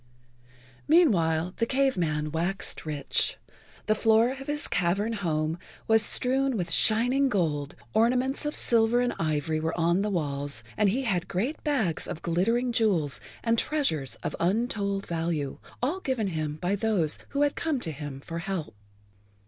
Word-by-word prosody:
[Pg 340 +3 +7
50]Meanwhile 170 - +1
the 230 - +1
Cave 270 0 +2
Man 150 -3 -1
waxed 170 +1 -2
rich. 150 -2 0 0.5
The 215 - +3
floor 225 +2 +3
of 270 +1 -8
his 295 0 -1
cavern 195 +5 0
home 160 -5 -1 0.3
was 225 0 +5
strewn 260 +3 +2
with 175 -3 -3
shining 245 +5 +3
gold, 150 - -1 0.2
ornaments 250 +5 +2
of 295 - -3
silver 230 0 +3
and 245 0 +1
ivory 155 0 0
were 160 +2 -2
on 170 +3 +2
the 210 - 0
walls, 145 - -1
and 210 -2 +3
he 255 +7 0
had 180 -7 -1
great 235 - -2
bags 235 - 0
of 155 - -6
glittering 230 +9 +1
jewels 195 -11 +1 0.2
and 230 -1 +2
treasures 160 - 0
of - - -3
untold 200 +1 0
value, 165 -4 -2 0.2
all 305 +9 0
given 255 - -1
him 155 -3 -3
by 180 +5 -1
those 195 -7 +1
who 285 +1 +1
had 290 - +1
come 315 -5 -1
to 165 - -3
him 145 -2 -7
for 165 +3 -6
help. 170 -9 -4
195 Hz, 160 wpm, -27 LUFS, 160-245 Hz, 0.5 s, Pg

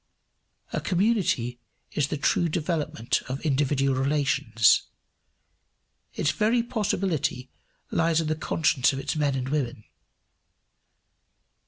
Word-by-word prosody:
A - - -1
community 180 - +1 0.3
is 145 -3 0
the 150 - -3
true 170 +4 +1
development 150 -7 -1
of 130 +2 -3
individual 135 -1 +1
relations. 135 -5 +2 1.3
Its 145 - +1
very 230 +2 +2
possibility 185 - -1 0.4
lies 165 -1 +2
in 165 - -1
the 155 0 0
conscience 155 -4 +1
of 135 - -3
its 135 +2 -3
men 145 -3 +1
and 130 0 -3
women. 130 -7 -2
150 Hz, 110 wpm, -26 LUFS, 135-170 Hz, 1.3 s, relations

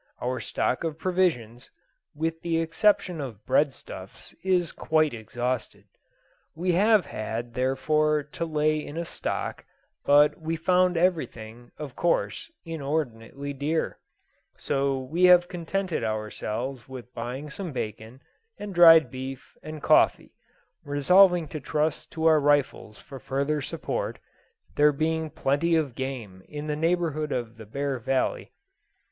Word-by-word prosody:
Our 125 0 -2
stock 125 +5 -1
of 160 -2 -3
provisions, 160 -11 -1 0.5
with 165 +2 -2
the 165 -1 0
exception 170 0 +1
of 110 -7 -8
breadstuffs, 130 -9 -2
is 180 -3 +1
quite 155 -2 +1
exhausted. 115 -2 -4 0.7
We 180 +3 0
have 205 +1 +4
had, 115 +1 -5
therefore, 150 +4 +1
to 150 +3 -6
lay 155 -1 +1
in 150 - -8
a 170 - -2
stock, - - -4 0.4
but 145 +2 +4
we 160 +1 -2
found 180 +1 +2
everything, 120 -10 -1
of 145 -3 -7
course, 175 - 0 0.2
inordinately 140 -4 -4
dear; 145 +4 -2 0.6
so 135 -1 0
we 155 +8 +1
have 180 -1 +7
contented 175 -3 -3
ourselves 110 +4 -4
with 125 -1 -10
buying 130 +5 -5
some 180 +1 -6
bacon, 110 0 -6 0.3
and 205 -1 -6
dried 165 -2 +8
beef, 130 0 -7
and 155 -1 -8
coffee, - - +3 0.5
resolving 175 +4 +4
to 155 - -5
trust 150 +2 -2
to 160 0 -2
our 160 -1 +6
rifles 140 -7 +1
for 135 - -11
further 140 +5 -1
support, - - -3 0.6
there 150 0 +5
being 160 +2 -1
plenty 150 +4 +1
of 150 -6 0
game 120 -8 -6
in 150 0 -6
the 150 -1 -2
neighbourhood 160 -2 0
of 120 -2 -3
the 110 -2 -11
Bear 140 +2 -2
Valley. 130 +3 -1
150 Hz, 130 wpm, -26 LUFS, 130-165 Hz, 0.7 s, dried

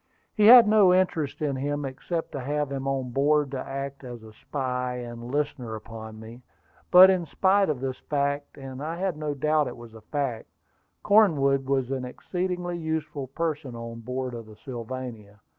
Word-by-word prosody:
He 210 -1 +4
had 240 -1 +10
no 210 -3 +6
interest 170 -6 +1
in 140 -2 0
him, 145 +1 -2
except 160 +5 -4
to 140 - -5
have 145 +2 -2
him 135 0 -3
on 135 -2 -2
board 145 +2 +2
to 135 - -3
act 140 +1 -6
as 120 -3 -8
a 110 -1 -13
spy 125 0 -3
and 120 -1 -7
listener 135 -5 -2
upon 110 0 -9
me. 115 +3 -11 0.5
But 185 +1 +9
in 180 -3 -1
spite 195 +4 +2
of 140 -5 -2
this 130 -1 -3
fact 145 0 -1
and 135 -1 -8
I 160 +3 -3
had 185 -2 -1
no 150 -1 -3
doubt 150 +1 +1
it 125 - -7
was 120 -1 -12
a 110 - -12
fact 130 -1 -3 0.6
Cornwood 140 -11 +4
was 135 -2 0
an 130 -1 -2
exceedingly 175 +6 -3
useful 155 -4 -3
person 145 -3 -3
on 115 0 -7
board 125 +2 -4
of 115 -2 -8
the 110 - -13
Sylvania. 120 -4 -7
135 Hz, 180 wpm, -26 LUFS, 125-155 Hz, 0.6 s, had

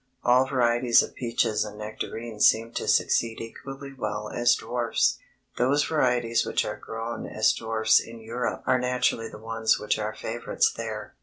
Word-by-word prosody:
All 125 +2 +4
varieties 120 -2 +3
of - - -8
peaches 115 -3 0
and 105 -1 -8
nectarines 110 +1 -1
seem 115 +1 +2
to - - -3
succeed 115 -1 +2
equally 135 +4 -8
well 105 -4 -4
as 120 0 +3
dwarfs. 120 +1 0 0.4
Those 140 +4 +3
varieties 125 -6 +1
which - - 0
are 105 - -3
grown 115 +2 -6
as 110 - +2
dwarfs 110 -1 +2
in 115 0 -9
Europe 115 +2 -3
are 130 - +3
naturally 125 -2 0
the - - -10
ones 110 0 0
which 105 - -1
are 105 0 -3
favorites 115 +1 -1
there. 110 -2 -6
115 Hz, 160 wpm, -26 LUFS, 110-125 Hz, 0.4 s, All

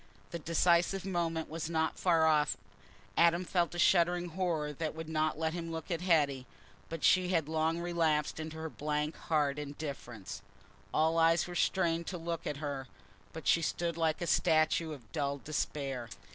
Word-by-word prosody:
The 170 - -4
decisive 170 +3 +2
moment 165 -4 -1
was 160 +1 -4
not 160 -1 0
far 165 -3 +4
off. 150 -1 +3 0.6
Adam 170 +2 +4
felt 175 -1 0
a - - -4
shuddering 175 0 +3
horror 165 -4 -1
that 155 +1 -3
would 160 0 -6
not 155 -1 0
let 160 0 -1
him 165 -1 -4
look 165 +3 -6
at 170 -1 -1
Hetty, 145 -7 +2 0.4
but 165 -1 -6
she 185 -1 +4
had 165 -5 +1
long 160 +1 0
relapsed 165 -4 0
into 160 0 -6
her 160 0 -4
blank 150 0 -2
hard 150 -2 0
indifference. 140 -7 -6 0.5
All 160 +1 +2
eyes 165 0 +4
were 175 - -7
strained 170 -2 +1
to 185 - -3
look 165 0 -4
at 145 - -3
her, 140 -3 -4 0.4
but 160 - -8
she 170 - +4
stood 170 +1 -1
like 165 0 0
a - - -1
statue 160 -1 +2
of 130 -8 -10
dull 140 -2 -1
despair. 135 -4 -3
160 Hz, 175 wpm, -32 LUFS, 150-170 Hz, 0.6 s, far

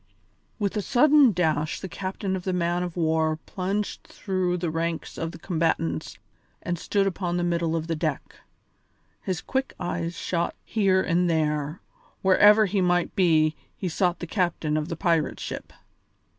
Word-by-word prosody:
With 205 -2 -1
a 210 - 0
sudden 280 +3 +5
dash 155 -4 0
the 190 - -6
captain 190 +1 -3
of 185 - -5
the 185 - -1
man 175 0 0
of 180 -1 -4
war 160 -1 +1
plunged 195 +2 -3
through 185 -2 -2
the 170 -2 -2
ranks 165 0 -3
of 165 0 -3
the - - -10
combatants 160 - -1 0.5
and 175 -1 -2
stood 200 +2 +1
upon 180 -2 -1
the 175 - 0
middle 170 -1 0
of 160 -1 -2
the 165 0 -2
deck; 155 -3 -3 0.8
his 185 -4 -3
quick 265 0 -2
eyes 170 0 -3
shot 170 -1 -1
here 195 -4 +2
and 175 +1 +2
there; 150 -1 0 0.4
wherever 205 +3 +6
he 195 0 0
might 175 -1 +1
be, 160 -5 +3 0.2
he 190 - -3
sought 175 +1 +1
the - - -6
captain 170 -4 -1
of 155 0 -1
the 165 - -4
pirate 165 -2 +1
ship. - - -6
175 Hz, 165 wpm, -26 LUFS, 160-190 Hz, 0.8 s, wherever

